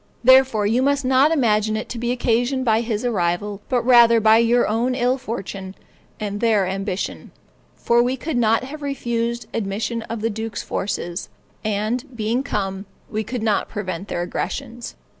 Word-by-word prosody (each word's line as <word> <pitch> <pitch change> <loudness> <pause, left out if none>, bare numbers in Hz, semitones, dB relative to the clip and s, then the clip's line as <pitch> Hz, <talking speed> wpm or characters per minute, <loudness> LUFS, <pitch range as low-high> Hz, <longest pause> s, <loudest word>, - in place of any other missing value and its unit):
Therefore, 260 -4 +5
you 230 +5 +2
must 280 0 +1
not 265 +3 +4
imagine 215 -7 +2
it 220 - -5
to 240 - -5
be 240 +1 -1
occasioned 245 +2 0
by 225 -1 +3
his 230 -1 -2
arrival, 200 -1 -1
but 245 -2 +1
rather 235 -2 +6
by 220 +1 +5
your 235 +1 +3
own 235 +4 0
ill 250 0 +2
fortune 195 -5 -6 0.4
and 205 -1 -3
their 220 -4 +3
ambition; 195 +1 -4 0.5
for 235 0 +2
we 250 +2 0
could 305 +3 -4
not 225 -1 +2
have 295 +4 -8
refused 235 -4 -2
admission 220 +2 -2
to 230 - -2
the 225 +1 -2
duke's 220 0 -5
forces, 175 -2 -3 0.3
and, 215 +4 -1
being 225 +3 0
come, 195 -6 -3 0.2
we 215 0 -1
could 230 +1 -4
not 215 -2 +1
prevent 190 -3 -5
their 175 - -2
aggressions. 240 +5 -5
230 Hz, 165 wpm, -21 LUFS, 210-245 Hz, 0.5 s, rather